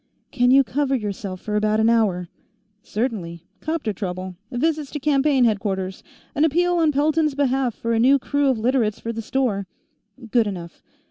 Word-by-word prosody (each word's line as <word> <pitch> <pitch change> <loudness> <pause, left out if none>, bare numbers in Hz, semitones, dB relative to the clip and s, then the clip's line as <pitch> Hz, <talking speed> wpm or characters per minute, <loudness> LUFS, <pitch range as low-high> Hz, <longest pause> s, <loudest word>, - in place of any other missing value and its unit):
"Can 245 -2 +2
you 270 +2 +6
cover 275 +1 0
yourself 200 -4 -4
for 210 - -3
about 215 +1 +2
an 220 - +3
hour?" 205 -6 +2 0.5
"Certainly. 200 -9 -3 0.2
'Copter 310 -9 -2
trouble. 185 -1 -5 0.2
Visits 300 +3 -1
to 295 - -5
campaign 280 -2 +2
headquarters. 195 -4 -1 0.3
An 300 -1 +1
appeal 350 +3 +2
on 320 -2 +3
Pelton's 300 +1 +1
behalf 265 -4 +1
for 230 0 -2
a 225 - +2
new 265 +4 +5
crew 285 +1 0
of 260 - +1
Literates 225 -2 +1
for 230 - -4
the 225 - -4
store 215 -5 -1 0.3
" 220 +2 -17
"Good 235 -3 +3
enough. 175 -4 -7
240 Hz, 175 wpm, -22 LUFS, 210-280 Hz, 0.5 s, you